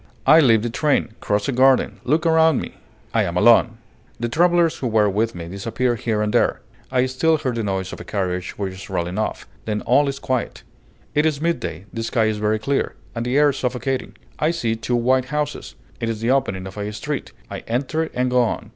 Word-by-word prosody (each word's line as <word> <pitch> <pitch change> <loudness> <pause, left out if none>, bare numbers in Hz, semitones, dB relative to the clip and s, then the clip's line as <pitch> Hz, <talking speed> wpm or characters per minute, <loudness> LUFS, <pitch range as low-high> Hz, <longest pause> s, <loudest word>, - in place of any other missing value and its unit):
I 155 +4 +7
leave 115 -7 +4
the 120 - -2
train, 145 -3 +1
cross 105 0 -1
a - - +1
garden, 130 +1 +3
look 155 +6 +1
around 160 -3 +4
me. - - -6 0.4
I - - +3
am 85 0 -1
alone. 115 +2 +5 0.4
The 120 0 -2
travelers 170 +3 +3
who 130 - -2
were 110 -2 +3
with 110 +2 0
me 85 -1 -6
disappear 115 +7 -1
here 110 -2 -1
and 105 - -1
there; - - +2 0.3
I 130 -1 +2
still 155 +5 +2
hear 130 -3 -2
the 115 -1 -2
noise 95 -3 -2
of - - -8
a - - -6
carriage 90 -3 -3
which 95 -2 -3
is 95 - -10
rolling 90 +1 -2
off; 110 - -3 0.2
then 105 -1 -2
all 140 +4 +3
is 140 0 -2
quiet. 130 -3 -3 0.5
It 150 +1 +3
is 150 -3 -1
midday, 125 - -2
the 115 - -3
sky 115 0 +1
is 110 -1 0
very 105 +1 +1
clear, 135 +6 -1 0.2
and 115 0 -3
the 125 +3 0
air 145 -1 +5
suffocating. 130 +1 -3 0.2
I 155 - +2
see 120 -10 -1
two 115 +2 -2
white 125 +2 +2
houses; 150 +2 -4 0.2
it 115 - -2
is 110 -2 -3
the 115 +3 +1
opening 125 -9 0
of 95 +2 -9
a 105 0 -3
street; 110 - -4 0.2
I - - -4
enter 140 +7 -1
and 125 0 0
go 125 0 +4
on. 120 - -2
120 Hz, 220 wpm, -21 LUFS, 105-135 Hz, 0.5 s, I